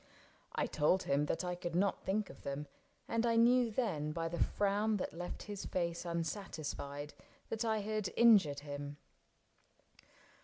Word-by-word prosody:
I - - +1
told 160 +5 +2
him 145 +2 +1
that 165 - -1
I 180 - -1
could 175 -1 -4
not 195 +2 +2
think 205 +2 -1
of - - -15
them, 140 +1 -4 0.4
And 230 0 +1
I 230 -1 +3
knew 240 +1 +5
then, 175 - -1
by 165 +1 -2
the 170 - -4
frown 205 +2 +2
that - - -3
left 175 +2 -5
his 205 -2 -6
face 170 -1 -1
Unsatisfied, 155 -4 -4 0.4
that 225 +1 -1
I 220 -2 +1
had 215 -1 -2
injured 195 -12 +6
him. 145 0 -6
180 Hz, 155 wpm, -35 LUFS, 150-215 Hz, 0.4 s, injured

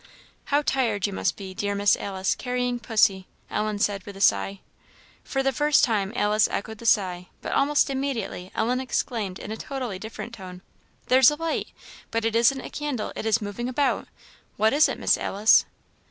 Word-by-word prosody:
"How 290 +1 +1
tired 235 -8 0
you 200 - -2
must - - 0
be, 190 -2 -8
dear 200 +1 -2
Miss 200 0 +4
Alice, 190 -1 -2
carrying 250 -1 -2
pussy!" 210 -5 +2 0.2
Ellen 215 0 -1
said, 205 -2 0
with 200 0 -10
a - - -10
sigh. 195 - +2 0.6
For 270 0 -2
the 270 - +2
first 295 0 +3
time 205 -5 +1
Alice 210 -2 +3
echoed 220 +1 -4
the 235 - -5
sigh; 180 -4 +2 0.2
but - - -4
almost 290 +1 +3
immediately 265 -9 -3
Ellen 245 +3 +1
exclaimed 225 -6 -2
in 210 - -8
a 220 - -4
totally 250 -9 -5
different 225 +3 -7
tone, 185 -4 -10 0.4
"There's 255 -1 +6
a 295 - -2
light! 330 +1 -2 0.4
but 230 0 -1
it 225 0 0
isn't 240 +4 +3
a - - -9
candle 290 -7 -3
it 220 - -4
is 220 0 +2
moving 210 +5 -4
about; 275 +2 0 0.5
what 220 +3 +3
is 300 +2 +5
it, - - -3
Miss - - +2
Alice?" 210 +3 +4
220 Hz, 185 wpm, -25 LUFS, 200-260 Hz, 0.6 s, There's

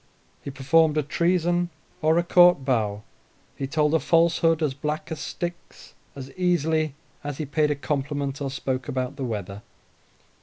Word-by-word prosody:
He - - -7
performed 150 +4 +2
a 150 - +2
treason 175 +3 +1 0.3
or 160 +1 +3
a 170 - +3
court 175 -5 +5
bow, 105 -6 0 0.5
he 135 - -4
told 150 +2 +1
a 160 - +4
falsehood 165 -1 +3
as 145 -3 0
black 150 +3 -4
as 160 - -4
Styx, 175 0 -7 0.2
as 135 -1 -8
easily 160 -3 0 0.3
as 145 -2 -5
he 155 - -3
paid 150 +2 +1
a 150 - +1
compliment 140 0 -3
or 140 - -2
spoke 130 -1 -3
about 130 -1 -3
the 140 - -5
weather. 105 -3 -5
150 Hz, 160 wpm, -25 LUFS, 135-165 Hz, 0.5 s, court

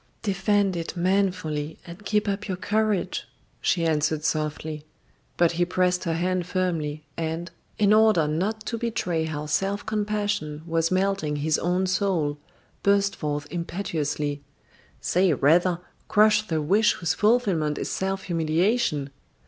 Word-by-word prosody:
"Defend 200 -1 +1
it 170 +1 -4
manfully 175 -5 0
and 170 +4 -10
keep 210 0 0
up 200 +1 -2
your 185 -2 -2
courage," 215 0 0 0.3
she 170 -3 +1
answered 155 -1 +1
softly; 155 0 -2 0.5
but 170 -1 +4
he 175 +1 +1
pressed 180 0 +1
her 165 -1 0
hand 180 +1 -1
firmly, 165 -5 -1
and, 165 +1 -3 0.3
in 210 0 +4
order 215 -8 +5
not 205 +8 -2
to 230 - -3
betray 180 -8 -1
how 150 -1 -4
self 195 +7 -1
compassion 205 -8 -2
was 165 -1 +1
melting 185 -5 0
his 150 +1 +1
own 180 +2 +1
soul, 180 -6 0 0.4
burst 200 0 +2
forth 145 -1 -3
impetuously: 155 -5 -2 0.6
"Say 180 -1 +2
rather: 170 +6 +3 0.3
Crush 215 0 +4
the 160 -4 -1
wish 210 +6 +4
whose 170 -3 -1
fulfilment 195 -10 +2
is - - -3
self 190 0 -2
humiliation! 165 - +1
180 Hz, 135 wpm, -25 LUFS, 155-200 Hz, 0.6 s, order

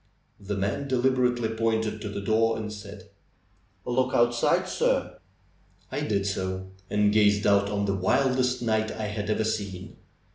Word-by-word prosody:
The 100 0 -4
man 100 +9 -2
deliberately 125 -2 +1
pointed 110 -1 -1
to 105 - -4
the 100 0 -5
door 115 +2 +2
and 105 -1 -5
said: 100 0 -11 0.7
'^Look 125 +1 0
outside, 120 0 +2
sir!" - - 0 0.7
I - - -2
did 100 -2 0
so, 95 -1 -3 0.2
and 105 0 +2
gazed 105 -1 +3
out 100 0 +3
on 100 0 -1
the 100 - 0
wildest 125 +5 +1
night 110 -1 +1
I 110 - -4
had 105 0 -4
ever 110 0 +1
seen. 100 -4 -4
110 Hz, 150 wpm, -26 LUFS, 100-120 Hz, 0.7 s, gazed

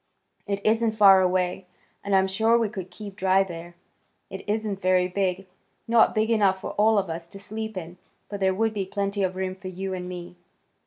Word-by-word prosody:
It 200 0 -3
isn't 225 0 +2
far 195 -3 +7
away, 180 0 0 0.4
and 200 -1 +1
I'm 190 0 +4
sure 220 +5 +2
we 230 -2 0
could 190 -3 -7
keep 200 +1 -9
dry 190 0 +3
there. 175 -2 -9 0.6
It 190 - -7
isn't 210 -2 -2
very 185 0 +3
big. 190 0 -1 0.4
Not 230 -1 +4
big 220 +1 +1
enough 200 -4 +3
for - - -5
all 215 +1 +3
of 195 -2 +1
us 165 0 -5
to 195 +3 -11
sleep 220 +1 -6
in, 175 0 -8 0.3
but 205 - -6
there 190 -1 +2
would 225 +2 0
be 200 -2 -2
plenty 200 0 -2
of 185 -1 0
room 185 0 -2
for 185 0 -10
you 190 +1 -4
and 180 -1 -5
me." 175 0 -8
195 Hz, 205 wpm, -25 LUFS, 185-210 Hz, 0.6 s, far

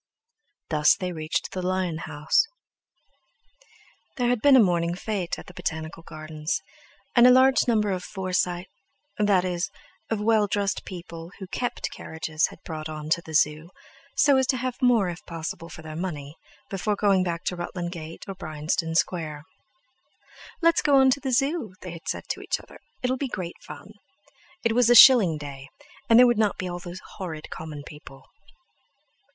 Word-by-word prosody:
Thus 150 -1 +5
they 185 -1 -4
reached 155 -2 -3
the 185 - -4
lion 180 -3 -1
house. 155 - +1 1.7
There 245 -2 +1
had 245 -3 +1
been 285 -2 +7
a - - +8
morning 175 -4 +2
fête 190 -3 -3
at - - -10
the 180 - -13
Botanical 160 0 -5
Gardens, 155 -1 -4 0.6
and 240 0 +8
a - - +8
large 260 +1 +5
number 215 -4 +2
of 185 -1 -3
Forsy—that 185 +2 -2
is, 180 -1 -2 0.4
of 225 - -1
well 215 -1 +3
dressed 200 -1 -1
people 170 -2 -8
who 195 - -7
kept 245 +6 -3
carriages 160 0 -2
had - - -13
brought 155 -1 -5
them 155 - -6
on 155 0 -7
to 170 - +3
the 160 -2 -8
Zoo, 150 +3 +2 0.5
so 285 -2 +5
as 265 -1 +2
to 260 - +1
have 255 0 -3
more, 240 -6 +4
if 175 -1 -6
possible, 165 +1 -6
for 160 - -10
their 155 -1 -8
money, 150 -5 -5 0.4
before 200 +2 -1
going 195 -2 +3
back 170 -1 -3
to 180 - -2
Rutland 175 0 -4
Gate 165 -2 -8
or 195 - -4
Bryanston 160 -1 -3
Square. 155 -3 -1 1.2
"Let's 335 0 +4
go 285 - +3
on 265 -1 +6
to 280 - +1
the 270 -2 -3
Zoo," 270 - 0
they 180 - -6
had 170 -1 -11
said - - -2
to - - -3
each - - -2
other; - - -15 0.2
"it'll 255 +1 +1
be 275 - -2
great 180 -7 -6
fun!" 210 - -11 0.7
It 230 -1 +2
was 245 0 +4
a 240 - +6
shilling 220 - +9
day; 140 -2 -9 0.4
and 230 - +7
there 250 - +9
would 240 -3 +3
not 215 -2 +2
be 185 - -3
all 175 0 -5
those 175 +1 -8 0.2
horrid 160 -5 -6
common 155 -2 -7
people. 150 -3 -12
180 Hz, 180 wpm, -25 LUFS, 160-225 Hz, 1.7 s, shilling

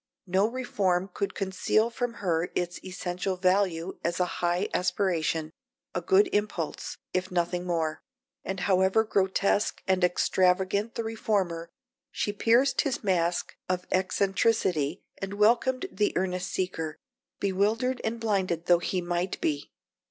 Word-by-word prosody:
No 190 +2 +2
reform 200 -7 0
could 200 - -2
conceal 195 +4 +1
from 240 -1 -3
her 165 -1 +1
its 175 0 -2
essential 180 0 -3
value 185 -1 +1
as 170 0 -1
a 180 - +3 0.2
high 175 +3 +1
aspiration, 165 -4 0 0.4
a - - -1
good 395 +1 +4
impulse, 205 -6 -2 0.2
if 185 0 -1
nothing 175 0 -1
more; 160 -3 -1 0.4
and 190 0 -4
however 190 +3 +3
grotesque 200 -1 +1
and 190 -1 +2
extravagant 185 +4 +2
the 230 - -2
reformer, 195 -7 -1 0.4
she 205 - -2
pierced 245 +6 +3
his 280 -6 -2
mask 175 -3 0
of 180 0 -1
eccentricity 185 -4 +1 0.2
and 195 +1 -4
welcomed 235 +5 +3
the 205 +2 0
earnest 180 -1 -1
seeker, 165 -4 -3 0.4
bewildered 215 +6 +1
and 225 +1 -2
blinded 190 -6 0
though 175 -1 +5
he 180 +1 -1
might 175 +1 -2
be. 145 -2 -2
185 Hz, 130 wpm, -28 LUFS, 175-210 Hz, 0.4 s, though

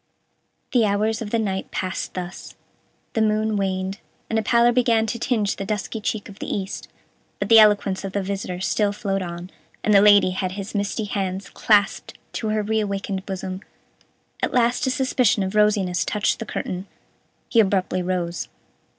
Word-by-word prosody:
The 245 -3 +4
hours 215 +2 +1
of 215 - -4
the 230 - +1
night 195 -4 -2
passed 185 0 -4
thus: 180 -1 -7 0.6
the 225 - +1
moon 215 0 +1
waned, 190 0 -2 0.3
and 225 - +2
a - - +1
pallor 235 +2 +4
began 235 -2 +3
to 230 +2 -3
tinge 220 -5 0
the - - -3
dusky 210 +2 -3
cheek 210 0 -2
of 200 0 -13
the - - -4
east, 195 -1 -4 0.5
but 200 - -3
the 225 -1 +9
eloquence 205 -3 +4
of 195 -1 -5
the 200 - -1
visitor 190 -2 -4
still 205 +1 +1
flowed 195 -2 -2
on, 175 +1 -6 0.3
and 215 - +3
the 200 - +7
Lady 205 -2 +6
had 185 0 -2
his 195 0 -6
misty 205 +2 -1
hands 195 -1 -3
clasped 205 -2 +2 0.2
to 220 - -3
her 215 0 0
reawakened 200 -2 -2
bosom. 190 -1 -4 0.8
At - - -1
last 245 +1 +2
a - - +3
suspicion 255 -6 +2
of 190 +1 -3
rosiness 210 -4 +2
touched 210 - 0
the 225 - -6
curtain. 185 +2 -4 0.6
He 230 - +2
abruptly 190 -3 +2
rose. 175 -1 -2
205 Hz, 175 wpm, -23 LUFS, 190-220 Hz, 0.8 s, the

